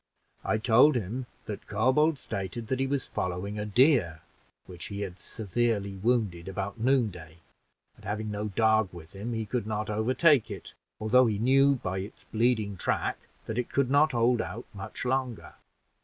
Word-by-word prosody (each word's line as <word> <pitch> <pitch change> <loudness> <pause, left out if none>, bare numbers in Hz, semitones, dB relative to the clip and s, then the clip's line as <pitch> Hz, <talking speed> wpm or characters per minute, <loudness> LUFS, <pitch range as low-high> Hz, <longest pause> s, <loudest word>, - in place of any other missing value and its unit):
I 110 - +1
told 125 +6 +5
him 120 +3 -3 0.2
that 105 -2 -7
Corbould 130 +9 +2
stated 105 0 -5
that 130 - 0
he 135 - +1
was 140 0 -1
following 95 +3 -3
a 105 - -3
deer, 105 - +3 0.4
which 90 -2 -9
he 100 0 -5
had 95 -2 -5
severely 105 -2 -1
wounded 100 -5 0
about 100 +3 -4
noonday, 105 - 0 0.6
and - - -20
having 105 +1 -3
no 105 +1 -3
dog 110 0 +2
with 85 -1 -12
him 105 +5 -5
he 110 -1 -2
could 115 -1 -2
not 110 0 -2
overtake 130 +6 +3
it, - - -8 0.3
although 120 +4 +4
he 105 -2 0
knew 135 +5 +4
by 95 -6 -3
its 100 +4 -8
bleeding 110 -3 0
track - - -1 0.3
that 110 +2 -3
it 125 - -3
could 140 -2 +1
not 145 +1 +4
hold 120 0 +3
out 115 +3 -6
much 100 +5 -7
longer. 130 -2 -2
110 Hz, 170 wpm, -28 LUFS, 100-125 Hz, 0.6 s, told